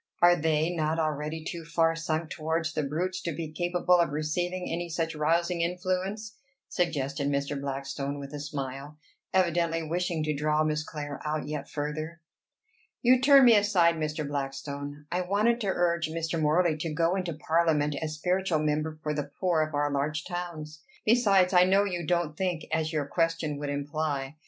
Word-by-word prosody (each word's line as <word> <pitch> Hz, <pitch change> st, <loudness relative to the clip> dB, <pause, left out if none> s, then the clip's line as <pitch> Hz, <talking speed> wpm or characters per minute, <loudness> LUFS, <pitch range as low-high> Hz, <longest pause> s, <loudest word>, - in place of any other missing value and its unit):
Are 175 Hz, 0 st, +7 dB
they 160 Hz, 0 st, +1 dB
not 155 Hz, 0 st, 0 dB
already 155 Hz, 0 st, -2 dB
too 170 Hz, -1 st, -5 dB
far 165 Hz, 0 st, +2 dB
sunk 160 Hz, 0 st, -2 dB
towards 160 Hz, +1 st, -1 dB
the -, -, 0 dB
brutes 175 Hz, +6 st, -2 dB
to 170 Hz, -, -2 dB
be 160 Hz, 0 st, -5 dB
capable 175 Hz, +2 st, +2 dB
of 170 Hz, -3 st, +3 dB
receiving 175 Hz, +5 st, -2 dB
any 170 Hz, +1 st, -3 dB
such 165 Hz, 0 st, -2 dB
rousing 170 Hz, +3 st, +1 dB
influence?" 185 Hz, +5 st, -2 dB, 0.3 s
suggested 140 Hz, -5 st, -1 dB
Mr. 140 Hz, 0 st, -1 dB
Blackstone 140 Hz, +1 st, -3 dB
with 140 Hz, 0 st, -8 dB
a 145 Hz, -, -4 dB
smile, 140 Hz, 0 st, -5 dB, 0.3 s
evidently 170 Hz, -2 st, +1 dB
wishing 170 Hz, 0 st, -1 dB
to 155 Hz, 0 st, 0 dB
draw 150 Hz, +1 st, +1 dB
Miss 155 Hz, -1 st, 0 dB
Clare 145 Hz, -2 st, -6 dB
out 150 Hz, 0 st, -2 dB
yet 150 Hz, -2 st, -5 dB
further. 155 Hz, +3 st, -4 dB, 0.8 s
"You 250 Hz, +1 st, +5 dB
turn 275 Hz, -1 st, +7 dB
me 235 Hz, -2 st, +8 dB
aside, 200 Hz, -5 st, +4 dB
Mr. 155 Hz, -2 st, -3 dB
Blackstone. 145 Hz, +1 st, -5 dB
I 180 Hz, -, 0 dB
wanted 210 Hz, +6 st, +1 dB
to 205 Hz, -, -2 dB
urge 170 Hz, -3 st, +1 dB
Mr. 165 Hz, 0 st, -2 dB
Morley 155 Hz, +1 st, +3 dB
to 155 Hz, +1 st, -3 dB
go 165 Hz, +3 st, +1 dB
into 180 Hz, -3 st, -2 dB
parliament 155 Hz, -1 st, +1 dB
as 155 Hz, -1 st, -3 dB
spiritual 180 Hz, +1 st, 0 dB
member 155 Hz, +1 st, -1 dB
for 150 Hz, -, -1 dB
the 145 Hz, -1 st, -3 dB
poor 175 Hz, -4 st, +2 dB
of 155 Hz, -1 st, -2 dB
our 145 Hz, 0 st, +1 dB
large 150 Hz, +2 st, -1 dB
towns. 160 Hz, -4 st, -6 dB, 0.2 s
Besides, 200 Hz, -5 st, +4 dB
I 180 Hz, 0 st, +7 dB
know 195 Hz, +2 st, +4 dB
you 175 Hz, -5 st, -3 dB
don't 170 Hz, -3 st, 0 dB
think 180 Hz, -2 st, -2 dB
as 160 Hz, 0 st, 0 dB
your 150 Hz, -3 st, -1 dB
question 165 Hz, -1 st, -1 dB
would 145 Hz, -1 st, -3 dB
imply. 145 Hz, 0 st, -2 dB
160 Hz, 175 wpm, -28 LUFS, 150-175 Hz, 0.8 s, me